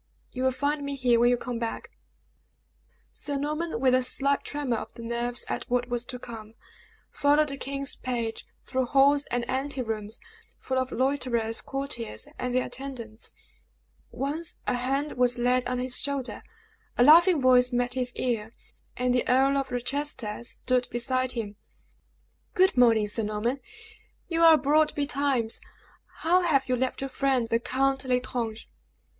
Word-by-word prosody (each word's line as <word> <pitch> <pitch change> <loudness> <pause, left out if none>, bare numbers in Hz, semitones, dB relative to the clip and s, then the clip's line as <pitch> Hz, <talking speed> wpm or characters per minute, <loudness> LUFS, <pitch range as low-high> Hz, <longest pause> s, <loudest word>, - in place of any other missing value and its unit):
"You 255 - -5
will 260 - +3
find 285 +3 -1
me 280 0 -3
here 245 -3 +3
when 240 +1 +5
you 245 - +3
come 240 -1 -5
back." 230 -1 -4 1.2
Sir 285 -1 -3
Norman, 300 0 -2
with 255 0 +3
a 255 - +4
slight 275 +2 +2
tremor 285 -5 -2
of - - -7
the 230 - -9
nerves 235 +1 -2
at - - -4
what 245 0 0
was 240 0 -1
to 255 0 -6
come, 225 -2 -9 0.6
followed 295 +1 +3
the 275 - -5
king's 275 +1 -2
page 235 -3 -3 0.2
through 260 -1 -1
halls 280 +2 +4
and 245 -1 -2
anterooms, 250 -6 -3 0.4
full 260 0 -2
of 260 0 -2
loiterers, 250 -4 0
courtiers, 270 -5 -3
and 250 0 -2
their 255 - +2
attendants. 235 -5 -7 0.8
Once 305 +5 -3
a - - 0
hand 270 +4 -1
was 245 -1 +3
laid 250 +1 +1
on 250 - -1
his 250 0 +1
shoulder, 280 -3 -3 0.6
a 240 - +5
laughing 335 +4 +7
voice 250 -1 +4
met 245 0 0
his 250 -1 -1
ear, 230 -3 -2 0.4
and 250 0 +1
the 250 - +1
Earl 270 +2 +4
of 275 -1 -1
Rochester 245 -3 -2
stood 250 +1 +1
beside 255 +1 0
him! 210 -4 -5 1.0
"Good 375 -2 +4
morning, 230 -4 +5
Sir 210 +2 -1
Norman; 215 +5 -2 0.7
you 330 -1 -1
are 325 -1 +8
abroad 305 +1 +2
betimes. 275 -5 0 0.6
How 355 +3 +4
have 280 -7 +2
you 255 - +1
left 260 +2 -2
your 270 - -2
friend, 265 -4 +1
the 230 0 +1
Count 270 +2 0
L'Estrange?" 250 -3 -2
255 Hz, 160 wpm, -27 LUFS, 240-275 Hz, 1.2 s, are